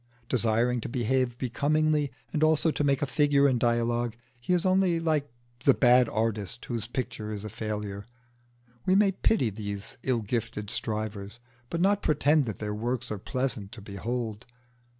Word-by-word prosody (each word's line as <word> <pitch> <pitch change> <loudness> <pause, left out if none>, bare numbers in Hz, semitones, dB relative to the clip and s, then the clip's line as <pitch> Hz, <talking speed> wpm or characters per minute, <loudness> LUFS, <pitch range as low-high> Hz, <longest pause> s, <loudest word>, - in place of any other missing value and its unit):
Desiring 120 0 +2
to - - -5
behave 125 0 0
becomingly 150 +3 +1 0.2
and 155 - 0
also 155 +1 +3
to 150 - -1
make 140 -1 +2
a - - +3
figure 145 0 +3
in 130 -3 +2
dialogue, 120 0 +1 0.2
he 120 - -4
is 180 0 +2
only 185 -2 +3
like 155 -4 0 0.3
the 135 - +5
bad 125 -2 +5
artist 110 -1 -1
whose 115 -3 -3
picture 120 -3 -4
is 105 0 -5
a - - -4
failure. 105 -1 -5 0.8
We 185 - +3
may 200 0 +5
pity 185 - +1
these 100 +4 -6
ill 125 -3 0
gifted 110 -1 -3
strivers, 110 0 -3 0.3
but 170 - -2
not 200 +2 +3
pretend 150 -1 +3
that 110 - -4
their 105 -1 -3
works 120 +3 -2
are 105 - -3
pleasant 125 -3 -3
to 110 - -7
behold. 110 +2 -4
120 Hz, 165 wpm, -28 LUFS, 110-145 Hz, 0.8 s, the